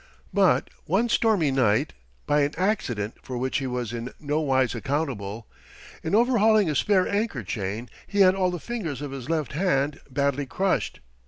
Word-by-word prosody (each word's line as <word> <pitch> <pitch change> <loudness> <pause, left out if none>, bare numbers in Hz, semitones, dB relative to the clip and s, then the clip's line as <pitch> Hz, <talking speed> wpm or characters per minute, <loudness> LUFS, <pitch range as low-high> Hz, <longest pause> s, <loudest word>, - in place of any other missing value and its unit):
But - - +3
one 240 +1 +1
stormy 210 -11 +3
night, 130 +1 +2 0.3
by 145 0 +3
an 145 +1 0
accident 155 - -1
for 125 - -6
which 130 +3 -1
he 135 - -3
was 125 -2 -3
in 120 +1 -5
nowise 140 -4 +1
accountable, 115 -5 -3 0.6
in 160 +5 0
overhauling 220 -3 +4
a - - -2
spare 190 +4 +3
anchor 200 - -1
chain 105 +4 -4 0.2
he 200 -1 +1
had 185 -1 +7
all 190 -1 +1
the 175 -1 -4
fingers 165 - -4
of 145 - -5
his 135 0 -7
left 155 -4 -1
hand 145 -4 +1
badly 140 +1 0
crushed. 190 +7 -1
145 Hz, 165 wpm, -25 LUFS, 125-190 Hz, 0.6 s, had